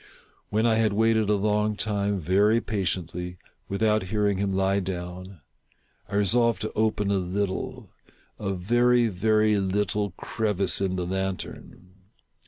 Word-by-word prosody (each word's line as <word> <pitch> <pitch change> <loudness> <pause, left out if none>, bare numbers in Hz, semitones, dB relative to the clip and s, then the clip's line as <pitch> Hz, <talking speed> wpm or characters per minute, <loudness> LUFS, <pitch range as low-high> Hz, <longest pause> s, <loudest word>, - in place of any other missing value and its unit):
When 110 +2 +1
I 115 -1 +3
had 110 -2 +2
waited 110 0 +2
a 105 - +4
long 105 +1 +1
time, 100 -2 -1
very 100 +7 +3
patiently, 90 -4 -3 0.3
without 105 +2 +2
hearing 100 0 0
him 100 -1 0
lie 95 +1 +1
down, 90 -1 -6 0.7
I 100 - -4
resolved 115 +1 +3
to 110 - -3
open 105 -2 0
a 100 - +2
little 95 +1 -3 0.2
— - - -33 0.2
a 100 -2 -2
very, 120 +5 +3
very 105 +2 +2
little 100 +1 0
crevice 100 -4 0
in 95 -1 0
the 90 -1 -2
lantern. 95 0 -5
100 Hz, 140 wpm, -26 LUFS, 95-110 Hz, 0.7 s, a